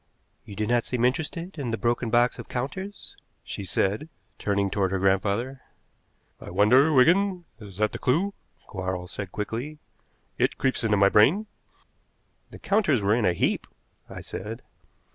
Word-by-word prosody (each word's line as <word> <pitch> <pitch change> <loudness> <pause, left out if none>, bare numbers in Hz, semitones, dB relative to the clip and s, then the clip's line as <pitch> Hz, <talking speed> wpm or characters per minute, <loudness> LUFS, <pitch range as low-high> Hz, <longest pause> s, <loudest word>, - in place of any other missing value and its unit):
"You 100 - -10
do 105 +2 -1
not 120 +1 +2
seem 125 -1 0
interested 165 +6 -2
in 130 -4 -3
the 115 - -1
broken 120 0 0
box 120 +2 +2
of - - -9
counters?" 190 +11 -5 0.3
she - - -6
said, 100 - -1 0.3
turning 100 -1 0
toward 95 -2 +1
her 95 - -1
grandfather. 100 +7 0 0.8
"I - - -9
wonder, 130 +9 +5
Wigan 175 +6 +3
is 100 -4 -11
that 105 0 +1
the - - -6
clew?" 175 +10 +1 0.3
Quarles 95 -2 -4
said 100 -3 -6
quickly. 120 +8 -4 0.6
"It - - +1
creeps 130 -2 0
into 105 -2 +2
my 100 0 +5
brain." 150 - +4 1.0
"The - - -11
counters 195 - +2
were 100 +1 +2
in 115 -2 +2
a 90 - +3
heap," - - 0 0.4
I - - -8
said. 110 +5 -7
120 Hz, 160 wpm, -26 LUFS, 100-145 Hz, 1.0 s, wonder